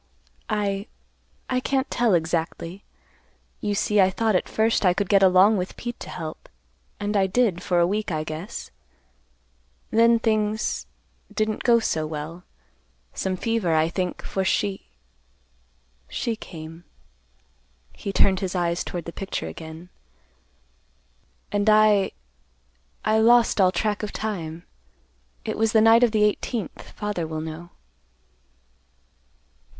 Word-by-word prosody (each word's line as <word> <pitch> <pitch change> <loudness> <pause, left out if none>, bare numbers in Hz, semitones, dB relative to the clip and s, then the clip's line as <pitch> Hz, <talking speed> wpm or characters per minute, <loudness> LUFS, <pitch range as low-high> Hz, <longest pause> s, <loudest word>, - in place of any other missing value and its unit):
"I—I 205 +4 -4
can't 265 +1 -1
tell 235 -5 +3
exactly. 170 +2 -2 0.8
You 205 -1 -1
see 210 0 +3
I 185 - +5
thought 220 +2 0
at - - 0
first 220 0 +1
I 180 -2 +4
could 200 0 -1
get 200 -1 +5
along 190 +3 +6
with 180 0 -4
Pete 240 0 -6
to - - -8
help, 155 -1 -7 0.5
and 205 +1 -2
I 195 -1 +3
did, 195 -3 +1
for 180 -2 0
a 170 - +5
week, 205 +2 -1
I 155 -1 -1
guess. 155 +5 -6 1.2
Then 230 +1 +5
things—didn't 215 0 -2
go 240 -2 +5
so 160 -8 -1
well. 155 +3 -6 0.7
Some 190 -1 -2
fever, 215 -6 0
I 160 +1 +3
think, 180 0 -3
for 190 - -2
she—she 195 +1 -1 1.5
came." 165 -3 -10 1.1
He 200 - -5
turned 190 -1 +3
his 190 -2 -3
eyes 175 -1 0
toward 175 -2 -5
the 170 - -7
picture 195 - -4
again. 160 - -10 1.6
"And 205 +1 +2
I—I 65 - 0
lost 235 -1 +5
all 185 -1 +5
track 210 +1 -1
of 210 - -4
time. 170 -6 -4 0.8
It - - -3
was 225 -1 +2
the 220 - +6
night 225 +1 +6
of 245 -2 +4
the 215 -1 +2
eighteenth. 210 -1 -2
Father 205 -6 -3
will 155 0 -4
know." 160 +2 -7
195 Hz, 125 wpm, -24 LUFS, 170-215 Hz, 1.6 s, along